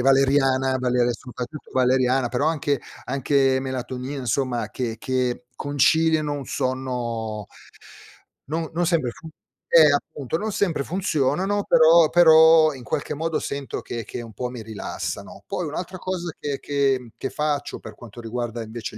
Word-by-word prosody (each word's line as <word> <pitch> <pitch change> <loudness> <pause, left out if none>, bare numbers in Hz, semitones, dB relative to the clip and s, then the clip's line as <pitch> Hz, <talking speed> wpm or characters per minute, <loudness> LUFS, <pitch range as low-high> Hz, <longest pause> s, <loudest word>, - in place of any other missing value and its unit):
valeriana, 135 0 +3
valere 125 -1 +1
soprattutto 125 +4 -8
valeriana 130 0 +2
però 125 +5 0
anche 145 -4 0 0.2
anche 135 0 +2
melatonina, 130 +1 -4
insomma 120 -2 -1
che 115 -3 -3
che 130 -1 -1
conciliano 155 +2 +2
un 145 -1 -4
sonno 120 -5 -3 1.0
non 160 +1 -2
non 175 +1 +1
sempre 160 -8 +1
fu 160 - -12 0.4
eh, 155 -3 +8
appunto, 145 +1 -2
non 215 +4 -3
sempre 190 -8 0
funzionano, 180 +3 0
però 160 0 +6
però 160 -2 +7
in 130 - -10
qualche 145 - -3
modo 160 +2 -1
sento 140 -1 -4
che 115 -1 -5
che 120 - -6
un 115 - -11
po' 125 +5 -4
mi 125 -2 -8
rilassano. 110 -2 -6
Poi 175 -3 -3
un'altra 180 +5 -5
cosa 175 -2 -3
che 140 -2 -3
che 140 -2 +1
mhmm, 120 -2 -13
che 135 - -4
faccio 145 -1 -2
per 110 - -10
quanto 120 -1 -12
riguarda 115 0 -4
invece 110 0 -7
135 Hz, 150 wpm, -23 LUFS, 125-155 Hz, 1.0 s, eh